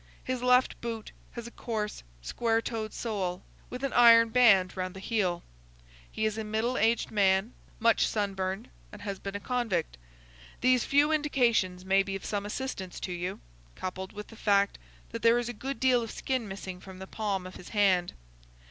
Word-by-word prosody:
His 255 -1 -3
left 250 +1 +3
boot 230 -2 -5 0.2
has 235 -1 -7
a 235 - -8
coarse, 215 -4 -4 0.2
square 225 - +1
toed 225 -2 -4
sole, 190 -5 -3 0.3
with 250 +2 -7
an 275 - -1
iron 230 -1 +7
band 220 -6 +5
round 185 -1 -4
the - - -7
heel. 190 -4 -1 0.7
He 220 - -1
is 215 0 -1
a - - -2
middle 220 +4 -1
aged 230 -1 +1
man, 195 +2 +2 0.3
much 230 0 +4
sunburned, 195 0 -2 0.2
and 205 -1 -11
has 200 -2 -4
been 195 0 -6
a - - -2
convict. 215 - -1 0.6
These 255 -1 +4
few 290 +2 +3
indications 235 -12 +1
may 195 +1 +4
be 195 0 -4
of 195 - -7
some 205 -1 -2
assistance 210 -6 -5
to 185 - -4
you, 175 - -4 0.3
coupled 190 +1 -5
with 210 0 -9
the 225 - -12
fact 200 -2 +2 0.3
that 230 - -5
there 230 +1 +5
is 240 0 -2
a - - -4
good 270 +5 -5
deal 255 -2 +4
of 230 - -5
skin 255 -2 -2
missing 190 -2 -7
from 190 0 -11
the 190 - -7
palm 195 -2 -3
of 185 - -9
his 180 - -11
hand. 190 -4 +2
215 Hz, 185 wpm, -29 LUFS, 190-235 Hz, 0.7 s, iron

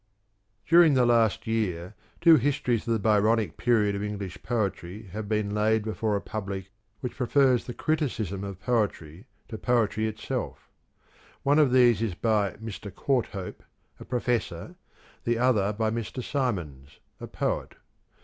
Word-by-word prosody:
DURING 165 -2 +6
the 125 -1 +4
last 115 -3 +2
year 100 -5 -2 0.3
two 165 -2 +8
histories 125 -4 0
of - - 0
the - - +2
Byronic 105 -3 +2
period 110 -4 +2
of 100 - -3
English 100 -3 -5
poetry 105 -3 -3
have 105 -1 -5
been 105 -2 0
laid 110 +1 +2
before 110 0 -1
a 100 - -1
public 95 -2 -5 0.3
which 125 - -5
prefers 130 0 +3
the 120 - -7
criticism 115 - -2
of 100 -2 -6
poetry 100 -7 -2 0.2
to 110 - -6
poetry 110 -2 +1
itself: 110 0 -5 0.8
one 145 +2 +4
of 145 -4 +4
these 120 -4 +5
is 110 -6 -1
by 105 -2 +1
Mr. 105 -2 -8
Courthope, 115 -8 -2 0.4
a - - -8
professor, 120 -2 -2 0.5
the 120 0 0
other 115 -5 +2
by 110 +1 -1
Mr. 115 +2 -4
Symons, 80 - -3 0.2
a - - -7
poet. - - -3
110 Hz, 145 wpm, -27 LUFS, 100-120 Hz, 0.8 s, two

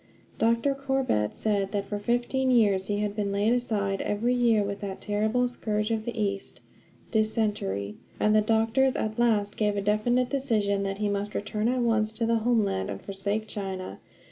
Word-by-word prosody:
Dr. 230 +5 +2
Corbett 270 - 0
said 200 -3 0
that 200 -1 -1
for 205 +1 -4
fifteen 245 +4 0
years 205 -6 +3
he 205 0 -1
had 205 -1 -2
been 205 -2 -1
laid 205 +3 +2
aside 205 -5 -1
every 230 +4 0
year 235 -4 +3
with 200 0 -4
that 195 -2 -5
terrible 215 +4 +1
scourge 215 -3 -2
of 220 -1 -1
the 235 -2 -4
East 200 -2 -2 0.5
dysentery; 210 - -1 0.2
and 210 0 +3
the 215 - +6
doctors 225 +4 +2
at 215 +2 -2
last 215 -4 +2
gave 210 -1 +1
a - - 0
definite 240 +5 +1
decision 215 -8 +1
that 195 0 -2
he 210 0 0
must 205 +1 -2
return 210 +1 -1
at 250 +1 +1
once 220 -2 +1
to 230 +1 -1
the 230 0 +2
homeland 215 - +1
and 100 -1 -6
forsake 200 +2 -2
China. 190 -3 -5
215 Hz, 180 wpm, -27 LUFS, 200-235 Hz, 0.5 s, the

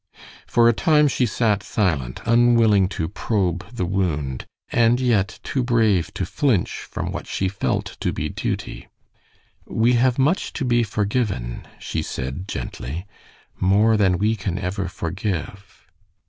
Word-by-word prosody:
For 120 0 +4
a 120 - +5
time 150 +8 +4
she 130 -2 +1
sat 105 -2 +1
silent, 80 - -1
unwilling 115 -4 +4
to 85 -5 -3
probe 95 -2 -1
the 115 -7 -2
wound, 80 -9 -2 0.2
and 120 +1 +3
yet 110 -5 +1
too 130 - -1
brave 110 -7 +2
to 95 - -1
flinch 120 - 0
from - - -4
what - - -6
she 95 - -1
felt 95 0 -2
to - - 0
be - - -3
duty. - - -4 0.8
"We 115 +2 +2
have 125 +1 +3
much 145 +8 +1
to 135 - -2
be 120 -1 +3
forgiven," 105 - -2
she - - -3
said, 65 +9 -5
gently. 80 0 -5 0.5
"More 105 +4 +4
than 95 -4 +3
we 110 +4 +1
can 95 -4 -3
ever 95 0 -2
forgive." 95 +2 -5
100 Hz, 145 wpm, -22 LUFS, 90-120 Hz, 0.8 s, a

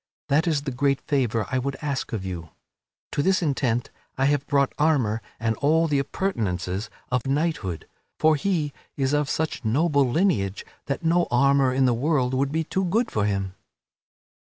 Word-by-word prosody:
That 155 +5 +3
is 150 -4 +1
the 140 - -3
great 135 +1 +1
favor 120 -5 0
I 130 - +1
would 135 +1 -3
ask 140 -3 -3
of 105 -5 -3
you. 85 -3 -5 0.6
To - - 0
this 185 +2 +2
intent 125 -5 0 0.3
I 135 - +2
have 145 0 +1
brought 140 -2 +2
armor 130 -8 +2 0.2
and 110 0 0
all 160 +3 +3
the 145 -3 +1
appurtenances 105 - -2 0.2
of 125 0 0
knighthood; 135 - -1 0.3
for 155 0 +4
he 150 -3 -1 0.2
is 135 0 0
of 145 -1 +1
such 160 0 -2
noble 140 +3 +2
lineage 120 - +1 0.2
that 140 +4 -3
no 170 +1 +3
armor 140 +1 +4
in 130 +1 +2
the 125 - +3
world 130 0 +1
could 135 +1 +1
be 160 +2 0
too 190 +4 -1
good 220 +7 +1
for 105 -1 0
him." 100 -2 -1
140 Hz, 175 wpm, -25 LUFS, 120-155 Hz, 0.6 s, for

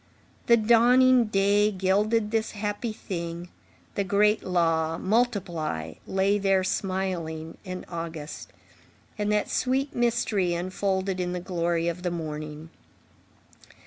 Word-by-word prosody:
The 235 - +7
dawning 240 +3 +5
day 205 0 +3
gilded 210 +3 +1
this 225 -1 -1
happy 210 +2 -3
thing, 170 -4 -6 0.4
the 200 - 0
great 210 +3 +2
law, 165 -3 +1
"Multiply," 180 - -1
lay 195 +2 +2
there 195 -1 +2
smiling 180 -5 -3
and 185 -2 -6
august, 165 -3 -6 0.7
and 210 0 0
that 210 0 +1
sweet 265 +2 0
mystery 230 -7 +1
unfolded 190 +1 -1
in 180 0 -1
the 180 - -2
glory 170 -1 -1
of 170 +1 -2
the 180 - -1
morning. 155 -1 -6
190 Hz, 115 wpm, -26 LUFS, 170-210 Hz, 0.7 s, The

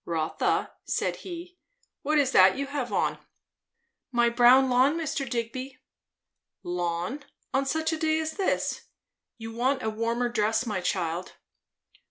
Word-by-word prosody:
"Rotha," 160 -1 -1
said - - -1
he, 355 0 -9 0.4
"what 305 +2 +1
is 275 -3 +3
that 185 +2 +6
you 280 - -1
have 275 -3 -4
on?" - - 0 0.9
"My 240 -1 +3
brown 245 +3 +6
lawn, 260 +5 +3
Mr. 290 -5 -3
Digby." 255 +3 -4 0.9
"Lawn? 175 - -3 0.3
on 270 0 +1
such 320 +3 0
a 320 - -3
day 315 -1 +2
as 315 0 -2
this? 390 +1 -1 0.5
You 225 -1 -7
want 260 +3 0
a 220 - -1
warmer 230 +2 -1
dress, 225 0 0
my 210 -5 -2
child." 175 -1 -2
245 Hz, 140 wpm, -27 LUFS, 220-285 Hz, 0.9 s, that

